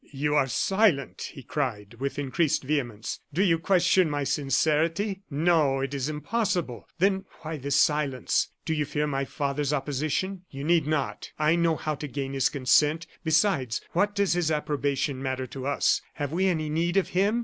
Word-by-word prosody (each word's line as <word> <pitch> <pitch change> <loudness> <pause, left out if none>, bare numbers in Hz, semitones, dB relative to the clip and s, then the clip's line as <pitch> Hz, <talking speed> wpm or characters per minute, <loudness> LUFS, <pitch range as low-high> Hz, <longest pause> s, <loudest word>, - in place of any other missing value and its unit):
"You 145 +1 -1
are 145 -3 +3
silent," 185 - +1
he 135 - -9
cried, 120 -5 -3
with 140 +1 -3
increased 145 +2 0
vehemence. 125 -7 -2
"Do 175 +7 +1
you 165 -4 +3
question 185 -1 +3
my 145 -1 -1
sincerity? 160 - +1
No, 150 -3 +2
it 135 +1 -3
is 140 +1 -2
impossible! 155 - -2
Then 190 +2 +2 0.2
why 155 0 -5
this 140 0 -1
silence? 145 -3 +2 0.2
Do 160 - 0
you 150 -1 0
fear 150 +1 -1
my 140 -2 -1
father's 140 0 -2
opposition? 150 +7 -1
You 135 0 -7
need 165 -1 +2
not. 155 -3 -2
I 155 +2 +3
know 170 -1 +2
how 155 0 -2
to 150 0 -5
gain 135 0 -4
his 135 -2 +2
consent. 150 +4 +2 0.2
Besides, 160 - +2
what 205 +4 +1
does 200 -3 +2
his 175 -2 +1
approbation 145 -3 -1
matter 130 -1 -2
to 130 +1 -6
us? 145 - +2
Have 145 -1 -4
we 185 +4 +1
any 160 -4 0
need 170 +4 0
of 195 - +2
him? 200 +5 +2
150 Hz, 175 wpm, -27 LUFS, 135-170 Hz, 0.2 s, are